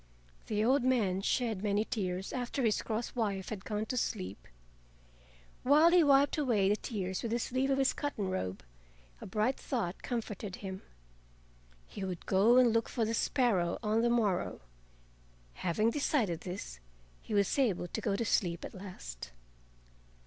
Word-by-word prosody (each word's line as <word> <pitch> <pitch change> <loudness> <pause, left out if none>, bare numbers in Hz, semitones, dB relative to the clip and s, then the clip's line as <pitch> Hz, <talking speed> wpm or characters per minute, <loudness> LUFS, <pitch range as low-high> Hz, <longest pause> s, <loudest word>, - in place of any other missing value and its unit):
The 215 0 0
old 260 +1 +3
man 215 -8 +2
shed 220 -1 0
many 205 +1 +1
tears 190 -4 -3
after 250 +1 -2
his 220 -3 +2
cross 225 +1 -3
wife 200 -6 -2
had 205 -4 -5
gone 215 0 -2
to 255 - -3
sleep. 95 - -3 1.1
While 300 +6 +6
he 350 -1 +6
wiped 280 +1 +4
away 220 -9 +2
the 205 - +3
tears 190 -5 -4
with 230 - -3
the 235 - +1
sleeve 260 +3 -1
of 270 - +2
his 270 -1 +3
cotton 285 -9 -3
robe, 95 - -3 0.6
a - - -7
bright 215 +7 0
thought 205 -9 -3
comforted 210 -5 -4
him: 190 -1 -7 1.0
he 200 - -7
would 185 -3 -5
go 210 +6 +4
and 245 -3 +5
look 230 0 +1
for 230 - 0
the 225 - -1
sparrow 215 -8 +1
on 215 +1 +2
the 240 - +2
morrow. 215 - 0 0.9
Having 215 +6 +1
decided 225 - 0
this 180 - -6 0.4
he 215 - -4
was 200 +6 +2
able 205 -9 +1
to 220 - -4
go 205 -3 0
to 230 - -1
sleep 175 -5 0
at - - -8
last. 60 - -8
215 Hz, 165 wpm, -32 LUFS, 190-245 Hz, 1.1 s, While